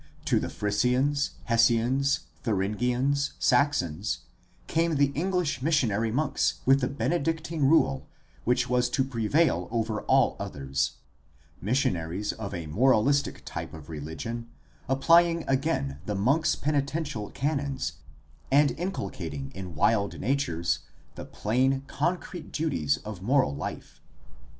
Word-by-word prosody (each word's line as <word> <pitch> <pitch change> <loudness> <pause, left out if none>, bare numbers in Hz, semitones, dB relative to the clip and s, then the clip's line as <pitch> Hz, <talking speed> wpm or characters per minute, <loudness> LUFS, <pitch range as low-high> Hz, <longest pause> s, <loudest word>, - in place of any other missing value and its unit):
To - - +3
the - - -3
Frisians, 125 +7 +1
Hessians, 125 +5 +3 0.2
Thuringians, 125 +6 0
Saxons, 140 - +1 0.4
came 165 0 +1
the 140 -1 +3
English 170 -4 -1
missionary 115 -8 +1
monks 140 +4 +1
with 135 +1 +5
the 125 - +1
Benedictine 160 +1 -1
rule 75 - +3 0.4
which 125 +1 +2
was 125 0 +2
to 130 +2 +1
prevail 135 +5 +1
over 110 -2 -1
all - - +3
others 70 -1 -2 0.3
— - - -32
missionaries 95 -5 0
of 110 -3 -6
a 85 -4 -5
moralistic 130 - +2
type - - -6
of 80 0 -11
religion 80 +11 -5 0.4
applying 165 +5 +4
again 130 - 0
the 105 - -1
monk's 145 +10 +2
penitential 145 -6 -2
canons 140 -1 -2 0.5
and 140 +1 +5
inculcating 80 - -4
in 95 -4 -7
wild 100 +4 +1
natures 100 - 0 0.3
the - - -8
plain, 130 +5 0
concrete 175 +4 -3
duties 80 - 0
of 105 -4 -7
moral 120 - +2
life. - - -7
130 Hz, 115 wpm, -27 LUFS, 105-145 Hz, 0.5 s, with